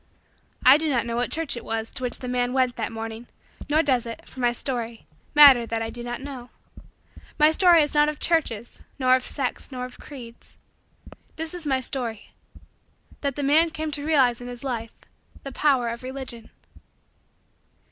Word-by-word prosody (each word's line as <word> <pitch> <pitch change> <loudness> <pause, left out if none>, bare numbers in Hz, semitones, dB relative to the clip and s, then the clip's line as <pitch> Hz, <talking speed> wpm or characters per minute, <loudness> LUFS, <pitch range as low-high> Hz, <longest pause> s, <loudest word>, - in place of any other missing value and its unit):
I 265 +4 +8
do 320 -1 -1
not 240 -5 +1
know 235 0 -3
what 245 +1 -1
church 325 -4 0
it 235 - -7
was 225 0 -3
to - - -6
which 250 -1 -1
the 250 - -7
man 245 0 0
went 255 -2 +1
that - - -3
morning 225 +1 -6 0.4
nor 310 +2 +3
does 255 -5 +1
it, 230 - -8
for 260 - -12
my 240 -1 +3
story, 235 -2 -5 0.3
matter 275 -6 +8
that 225 0 -2
I 225 - -4
do 240 - -7
not 240 +1 -5
know. 265 -3 -8 0.9
My 300 +1 +6
story 345 -1 +5
is 295 - -2
not 295 0 +4
of 300 - -5
churches 240 -9 -1 0.2
nor 255 -1 +4
of 255 - -1
sects 270 0 -4
nor 250 -1 -4
of 250 - -12
creeds. 240 -5 -12 0.8
This 320 +1 -5
is 345 -4 -6
my 265 -2 +1
story: 240 -4 -5 0.9
that 280 -2 -2
the 290 - -3
man 310 +4 +4
came 315 -1 -4
to 285 0 -3
realize 265 -6 +3
in 245 - -7
his 245 0 -8
life 230 -4 -4 0.5
the 275 - -6
power 265 -3 +2
of 235 0 -6
Religion. 255 -3 -7
255 Hz, 190 wpm, -24 LUFS, 240-290 Hz, 0.9 s, I